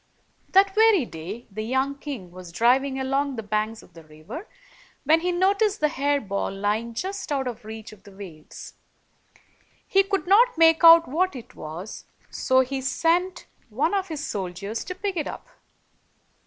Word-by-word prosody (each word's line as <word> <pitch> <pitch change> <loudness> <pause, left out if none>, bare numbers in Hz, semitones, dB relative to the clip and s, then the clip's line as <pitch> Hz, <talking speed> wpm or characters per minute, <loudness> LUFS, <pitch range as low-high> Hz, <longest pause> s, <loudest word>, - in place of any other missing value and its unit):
That 390 +1 +4
very 430 - +4
day, 190 +7 -8
the 215 +2 -5
young 265 +5 0
king 275 - -8
was 180 -1 -11
driving 260 +7 +2
along 275 +1 -1
the 225 - -5
banks 215 +1 -2
of 175 - -20
the 165 -1 -13
river, 155 - -10 0.6
when 310 +3 +4
he 360 +2 -1
noticed 395 +4 +1
the 300 - +2
hair 285 +1 0
ball 200 -5 -3
lying 210 +4 -2
just 380 - -5
out 270 -2 -1
of 240 -1 -6
reach 220 0 -9
of 205 - -17
the 200 - -15
waves. 185 -6 -11 1.1
He 390 - +4
could 390 -1 -2
not 435 +4 +4
make 325 0 +5
out 330 0 +9
what 350 +5 0
it 245 - -10
was, 165 +7 -8 0.3
so 260 0 +2
he 265 +1 -3
sent 345 +6 0 0.2
one 285 - 0
of 385 -1 0
his 310 -3 -5
soldiers 195 +2 -4
to 365 - -6
pick 395 0 -3
it 310 -4 -2
up. - - -8
270 Hz, 170 wpm, -24 LUFS, 215-350 Hz, 1.1 s, out